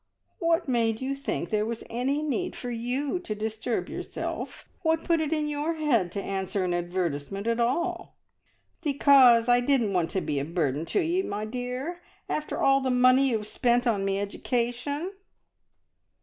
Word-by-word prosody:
"What 335 Hz, 0 st, +1 dB
made 230 Hz, -3 st, +1 dB
you 265 Hz, +1 st, -2 dB
think 275 Hz, -3 st, -3 dB
there 210 Hz, -1 st, +2 dB
was 230 Hz, +1 st, -4 dB
any 265 Hz, +6 st, -1 dB
need 355 Hz, +5 st, -2 dB
for 245 Hz, -, -5 dB
you 255 Hz, +8 st, -2 dB
to 280 Hz, -12 st, -5 dB
disturb 220 Hz, +2 st, -2 dB
yourself? -, -, -5 dB
What 320 Hz, -1 st, +1 dB
put 335 Hz, -2 st, +2 dB
it 310 Hz, -1 st, -2 dB
in 305 Hz, -2 st, 0 dB
your 300 Hz, +2 st, -1 dB
head 240 Hz, -, +1 dB
to 200 Hz, -, -3 dB
answer 195 Hz, 0 st, -2 dB
an 180 Hz, -1 st, 0 dB
advertisement 175 Hz, +1 st, -2 dB
at 230 Hz, 0 st, 0 dB
all?" 255 Hz, +9 st, -1 dB, 0.6 s
"Because 270 Hz, -6 st, +6 dB
I 245 Hz, 0 st, +5 dB
didn't 245 Hz, -5 st, +2 dB
want 175 Hz, -3 st, +1 dB
to 190 Hz, -, -1 dB
be 150 Hz, -3 st, -1 dB
a -, -, -1 dB
burden 155 Hz, -2 st, -1 dB
to 395 Hz, -, +1 dB
ye, 345 Hz, +3 st, +1 dB
my 210 Hz, -, -3 dB
dear, 250 Hz, +9 st, -4 dB, 0.3 s
after 305 Hz, -, -3 dB
all 275 Hz, 0 st, +5 dB
the 260 Hz, -, 0 dB
money 255 Hz, +2 st, +5 dB
you've 220 Hz, -3 st, -1 dB
spent 245 Hz, +3 st, +1 dB
on 215 Hz, -5 st, +1 dB
me 195 Hz, 0 st, 0 dB
education!" 245 Hz, -, -2 dB
245 Hz, 170 wpm, -27 LUFS, 210-285 Hz, 0.6 s, Because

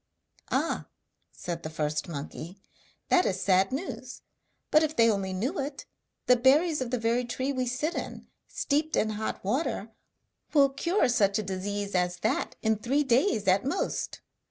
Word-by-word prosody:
'Ah!' -, -, 0 dB, 0.4 s
said 170 Hz, -1 st, -5 dB
the 155 Hz, -, -5 dB
first 155 Hz, -1 st, -2 dB
monkey, 160 Hz, +3 st, -7 dB, 0.5 s
'that 365 Hz, -, +5 dB
is 185 Hz, -1 st, -1 dB
sad 190 Hz, 0 st, +3 dB
news; 285 Hz, +9 st, -5 dB, 0.5 s
but 305 Hz, -, +6 dB
if 310 Hz, 0 st, 0 dB
they 230 Hz, -1 st, +5 dB
only 195 Hz, -2 st, -2 dB
knew 245 Hz, -, -2 dB
it, 275 Hz, 0 st, -4 dB, 0.4 s
the 250 Hz, -, +6 dB
berries 290 Hz, +5 st, +4 dB
of 255 Hz, -, -2 dB
the 250 Hz, -, 0 dB
very 230 Hz, +2 st, +1 dB
tree 260 Hz, +3 st, -2 dB
we 255 Hz, -1 st, -1 dB
sit 285 Hz, +7 st, -1 dB
in, -, -, -5 dB, 0.2 s
steeped 305 Hz, +2 st, 0 dB
in 215 Hz, -, +1 dB
hot 215 Hz, +1 st, -4 dB
water, 230 Hz, -2 st, -1 dB, 0.6 s
will 280 Hz, -2 st, +6 dB
cure 335 Hz, +8 st, +1 dB
such 205 Hz, -4 st, +3 dB
a 215 Hz, -, -1 dB
disease 200 Hz, +1 st, -3 dB
as 180 Hz, -1 st, +1 dB
that 225 Hz, +6 st, 0 dB
in 220 Hz, -1 st, +2 dB
three 260 Hz, +7 st, +1 dB
days 240 Hz, -, +2 dB
at 190 Hz, +1 st, +4 dB
most.' 280 Hz, +9 st, -2 dB
230 Hz, 165 wpm, -28 LUFS, 195-275 Hz, 0.6 s, but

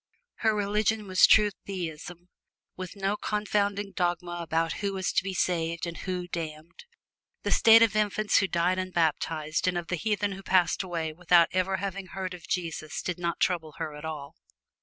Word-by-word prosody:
Her 220 Hz, -2 st, +2 dB
religion 210 Hz, +1 st, 0 dB
was 185 Hz, -1 st, +5 dB
pure 210 Hz, -1 st, +6 dB, 0.2 s
Theism, 175 Hz, -1 st, -6 dB, 0.5 s
with 185 Hz, +1 st, -7 dB
no 195 Hz, +1 st, -1 dB
confounding 205 Hz, -1 st, -1 dB
dogmas 175 Hz, -1 st, -2 dB
about 165 Hz, 0 st, 0 dB
who 200 Hz, -1 st, -1 dB
was 190 Hz, -1 st, -2 dB
to -, -, +2 dB
be 190 Hz, -1 st, -4 dB
saved 170 Hz, -1 st, 0 dB
and 170 Hz, -1 st, -5 dB
who 180 Hz, -1 st, -4 dB
damned. 160 Hz, -, -7 dB, 0.6 s
The -, -, -1 dB
state 225 Hz, 0 st, +7 dB
of 220 Hz, -2 st, +2 dB
infants 215 Hz, 0 st, +2 dB
who 195 Hz, -, +1 dB
died 180 Hz, +1 st, +1 dB
unbaptized 160 Hz, -3 st, -1 dB
and 180 Hz, -1 st, +1 dB
of 170 Hz, -1 st, -5 dB
the 180 Hz, -, -1 dB
heathen 205 Hz, +1 st, 0 dB
who 195 Hz, 0 st, -7 dB
passed 185 Hz, -2 st, +2 dB
away 165 Hz, -4 st, -3 dB
without 170 Hz, 0 st, +4 dB
ever 185 Hz, +1 st, +1 dB
having 195 Hz, 0 st, -4 dB
heard 185 Hz, 0 st, -5 dB
of 175 Hz, -2 st, -11 dB
Jesus 165 Hz, -3 st, -3 dB
did 180 Hz, -1 st, -3 dB
not 170 Hz, -1 st, -2 dB
trouble 160 Hz, -4 st, 0 dB
her 160 Hz, -2 st, -4 dB
at 150 Hz, -, -10 dB
all. 150 Hz, -3 st, -6 dB
180 Hz, 180 wpm, -28 LUFS, 170-195 Hz, 0.6 s, state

